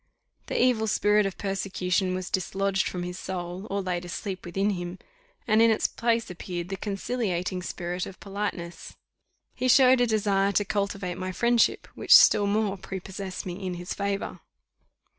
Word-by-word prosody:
The - - -1
evil 240 -3 +3
spirit 210 -1 +3
of 195 - -6
persecution 190 -2 -1
was 185 -1 -5
dislodged 195 +1 0
from 180 -1 -4
his 180 +1 -5
soul, 180 +1 -5
or 200 0 -1
laid 180 -1 -2
asleep 185 +2 -5
within 195 +4 0
him, 175 -1 -5 0.5
and 215 0 +4
in 230 - +6
its 220 - +1
place 230 -3 0
appeared 175 0 -5
the 195 - -2
conciliating 195 -3 -2
spirit 175 0 -4
of 190 - -11
politeness. 195 -4 -5 0.6
He 255 - -1
showed 255 0 +6
a 245 - +4
desire 200 -2 +2
to 205 - +2
cultivate 200 -3 -2
my 185 0 -3
friendship, 235 +5 +2
which - - +6
still 205 - +5
more 200 -1 0
prepossessed 190 0 -6
me 185 +1 -6
in 185 -1 -3
his 175 +1 -5
favour. 200 0 -3
195 Hz, 160 wpm, -27 LUFS, 180-210 Hz, 0.6 s, in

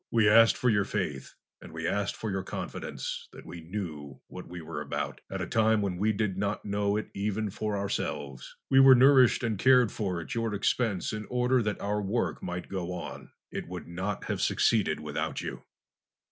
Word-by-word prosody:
We 115 -3 +3
asked 115 +2 +6
for 125 - +2
your 105 -2 +3
faith 90 -10 -4 0.3
and - - -11
we 80 +1 -4
asked 100 +2 -1
for 110 - -4
your 95 0 -1
confidence 95 - -5
that - - -12
we 85 -1 -8
knew 80 -7 -6
what - - -10
we 90 +1 -8
were 80 - -6
about, - - -4
at - - -3
a - - -2
time 110 -1 +3
when 95 -3 -2
we 105 +4 +2
did 100 -3 -1
not 100 +1 -2
know 100 0 0
it 110 - -5
even 105 +1 -2
for 105 +1 -2
ourselves. 70 -8 -4 0.2
We 135 - +7
were 135 -1 +9
nourished 130 -1 +6
and 110 -4 -1
cared 125 -2 +5
for 95 -5 -2
at 80 - -6
your 115 -2 -1
expense 100 -1 0
in 105 -1 -5
order 125 +1 +2
that 105 -2 -2
our 105 +1 -1
work 105 +4 -1
might 90 0 -5
go 90 -2 -4
on. 90 - -7 0.2
It - - -5
would - - -7
not 95 +4 -4
have - - -3
succeeded 105 -9 +2
without 75 +1 -3
you." - - -7
100 Hz, 200 wpm, -29 LUFS, 90-110 Hz, 0.3 s, were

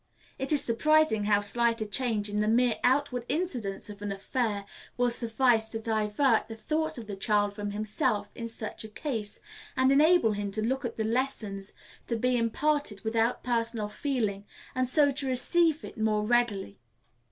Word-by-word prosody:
It 270 +2 -2
is 295 -2 +3
surprising 245 -2 +3
how 205 -1 +3
slight 230 +3 +1
a 215 - -2
change 215 -1 0
in 205 0 -2
the 210 - +1
mere 240 +1 +3
outward 255 -1 +2
incidents 245 - -2
of 205 -1 -10
an 205 -1 -3
affair 205 0 -2 0.3
will 245 0 +2
suffice 235 -1 +2
to 225 - -4
divert 220 +3 +1
the 225 - -7
thoughts 310 +7 -2
of 235 - -7
the 205 -1 -6
child 205 +1 +1
from 205 0 -4
himself 210 0 -1
in 230 - -5
such 225 -1 -6
a - - -7
case, 220 -3 -4 0.4
and 260 +1 +4
enable 300 -3 +5
him 205 -1 -3
to 215 - 0
look 265 +3 -1
at 235 - -4
the 220 - 0
lesson 225 -4 -1 0.5
to 235 - -1
be 250 +2 +1
imparted 240 -1 0
without 225 +2 0
personal 230 -3 -1
feeling, 215 -4 -2 0.3
and 255 0 0
so 285 +2 +4
to 275 0 -1
receive 315 +5 +2
it - - -10
more 215 -1 +1
readily. 220 - 0
230 Hz, 175 wpm, -28 LUFS, 210-260 Hz, 0.5 s, enable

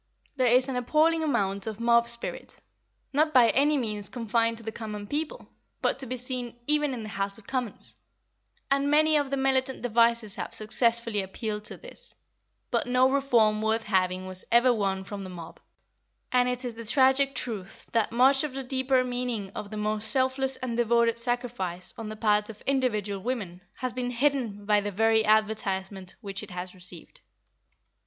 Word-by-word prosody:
There 255 -2 +2
is 250 +2 +4
an 265 - -3
appalling 310 +6 +2
amount 200 -9 +2
of 220 -1 -5
mob 235 0 +4
spirit 235 0 -1 0.5
(not 310 +1 +2
by 240 -3 +7
any 290 +2 +3
means 210 -5 -2
confined 230 -1 0
to 230 - -10
the 220 - -4
common 210 -2 -6
people, 300 +7 -4 0.3
but - - 0
to 265 - 0
be 255 +2 -3
seen 250 -1 -4
even 295 -2 +1
in 230 - -6
the 215 - -7
House 200 -2 +1
of 220 - -16
Commons), 250 -3 -3 0.7
and 280 +1 +2
many 310 +1 +4
of 290 -2 +1
the 275 - -1
militant 265 -1 +1
devices 230 -2 +2
have - - -5
successfully 230 0 +1
appealed 210 +2 -5
to - - -4
this; - - -4 0.6
but - - 0
no 255 +1 +3
reform 235 -6 +3
worth 220 +1 0
having 185 -3 0
was 185 0 -5
ever 240 +1 +5
won 195 -3 -1
from 200 0 -7
the 185 - -7
mob, 170 -3 -10 0.7
and 250 0 +3
it 250 +1 -3
is 245 - -3
the 230 0 -9
tragic 265 +2 +4
truth 205 -7 -5
that 225 -2 +1
much 265 +4 +4
of 290 -4 -4
the 270 - -3
deeper 260 0 +1
meaning 245 -5 -3
of 205 - -7
the 215 - -6
most 215 +1 -1
selfless 265 0 +1
and 250 -3 -4
devoted 235 0 +2
sacrifice 235 -8 -3
on 225 -2 -7
the 215 - -6
part 210 -1 +1
of 215 -1 -9
individual 215 -8 -1
women 200 -7 -4
has 255 -2 -3
been 250 0 -2
hidden 245 -5 -1
by 210 0 +3
the 205 0 -3
very 220 +2 +3
advertisement 205 -3 0
which 195 -3 -5
it - - -9
has 180 0 -6
received. 180 -2 -10
235 Hz, 180 wpm, -27 LUFS, 210-260 Hz, 0.7 s, by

